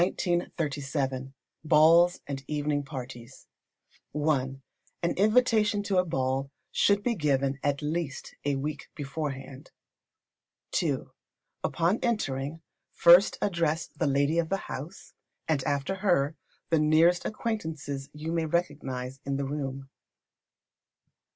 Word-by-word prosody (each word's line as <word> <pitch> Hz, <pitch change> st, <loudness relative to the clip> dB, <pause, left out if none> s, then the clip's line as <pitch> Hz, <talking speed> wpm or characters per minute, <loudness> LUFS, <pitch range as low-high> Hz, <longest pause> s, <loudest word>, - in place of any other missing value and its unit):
Balls 165 Hz, +3 st, +5 dB
and 135 Hz, -1 st, -5 dB
Evening 150 Hz, -1 st, 0 dB
Parties. 130 Hz, -4 st, -9 dB, 0.7 s
i. 150 Hz, +1 st, +3 dB, 0.7 s
An 170 Hz, -, +2 dB
invitation 215 Hz, -1 st, +3 dB
to 195 Hz, -2 st, +2 dB
a 180 Hz, -, +2 dB
ball 135 Hz, -3 st, -1 dB, 0.2 s
should 200 Hz, 0 st, +3 dB
be 245 Hz, -, +1 dB
given 140 Hz, -, 0 dB
at 145 Hz, +1 st, 0 dB
least 155 Hz, -2 st, -3 dB
a 145 Hz, -1 st, +1 dB
week 145 Hz, +1 st, -4 dB
beforehand. 140 Hz, -2 st, -5 dB, 1.1 s
ii. -, -, 0 dB, 0.6 s
Upon 175 Hz, +6 st, +1 dB
entering, 160 Hz, -, -1 dB, 0.3 s
first 175 Hz, +3 st, +6 dB
address 165 Hz, -4 st, 0 dB
the 160 Hz, -, -3 dB
lady 140 Hz, +4 st, +2 dB
of 165 Hz, -1 st, 0 dB
the 195 Hz, -, +1 dB
house; 155 Hz, +9 st, -8 dB, 0.3 s
and 150 Hz, -4 st, +1 dB
after 145 Hz, +4 st, 0 dB
her, 175 Hz, -7 st, +2 dB, 0.4 s
the 165 Hz, -, +4 dB
nearest 160 Hz, +3 st, +4 dB
acquaintances 160 Hz, -11 st, -4 dB
you 150 Hz, +2 st, -5 dB
may 165 Hz, -1 st, 0 dB
recognise 135 Hz, -6 st, -2 dB
in 140 Hz, 0 st, -2 dB
the 140 Hz, 0 st, -1 dB
room. 135 Hz, -1 st, -4 dB
150 Hz, 110 wpm, -28 LUFS, 140-170 Hz, 1.1 s, first